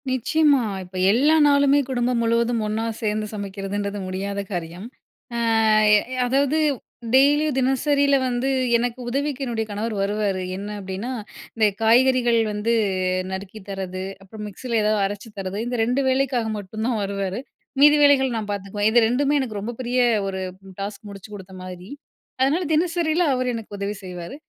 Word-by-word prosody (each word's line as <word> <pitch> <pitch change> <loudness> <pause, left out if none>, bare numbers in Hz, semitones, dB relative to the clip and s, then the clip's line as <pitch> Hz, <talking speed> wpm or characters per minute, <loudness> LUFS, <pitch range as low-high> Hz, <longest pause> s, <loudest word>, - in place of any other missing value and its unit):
நிச்சயமா, 280 +3 +3 0.2
இப்ப 180 +1 -15 0.2
எல்லா 275 +8 +4
நாளுமே 280 0 +4
குடும்பம் 245 -1 0
முழுவதும் 230 0 +1
ஒண்ணா 220 +2 -2
சேந்து 215 -1 -1
சமைக்கிறதுன்றது 200 0 -4
முடியாத 195 +2 -4
காரியம். 175 +3 -5 0.5
அ - - -1 0.6
எ - - +6 0.3
அதாவது 275 +4 +2 0.6
டெய்லியும், 290 +2 +4
தினசரில 280 +2 +2
வந்து 250 +1 -1 0.3
எனக்கு 245 +1 -2
உதவிக்கு 280 +1 -2
என்னுடைய 225 -3 -2
கணவர் 215 +2 -3
வருவாரு. 200 -1 -1 0.2
என்ன 200 +1 -6
அப்டின்னா, 195 +5 -5 0.4
இந்த 220 -2 +4 0.2
காய்கறிகள் 240 0 +4
வந்து 210 +3 0 0.6
நறுக்கி 195 +3 -6
தர்றது, 190 -1 -4 0.2
அப்புறம் 210 +2 -10
மிக்ஸில 230 +3 -2
ஏதாவது 210 0 +2
அரைச்சு 205 +3 -5
தர்றது 195 +3 -3
இந்த 245 0 -2
2 250 +4 +1
வேலைக்காக 260 -3 +1
மட்டும் 210 +2 -6
தான் 235 -4 0
வருவாரு. 195 +1 -3 0.4
மீதி 295 +1 +8
வேலைகள் 265 -4 +4
நான் 210 -2 -4
பாத்துக்குவேன். 205 +1 -1
இது 240 - +6
2மே 275 +5 +1
எனக்கு 225 -6 -3
ரொம்ப 225 +4 -4
பெரிய 250 0 -1 0.3
ஒரு 190 -1 -3 0.3
ம் 190 - -12
டாஸ்க் 200 +1 -6
முடிச்சு 200 +1 -11
குடுத்த 190 -1 -11
மாதிரி. 185 +1 -9 0.5
அதனால 290 +7 +2
தினசரியில 335 +1 +1
அவர் 255 0 -1
எனக்கு 220 -2 -7
உதவி 200 +1 -3
செய்வாரு. 180 +3 -7
225 Hz, 150 wpm, -23 LUFS, 200-260 Hz, 0.6 s, மீதி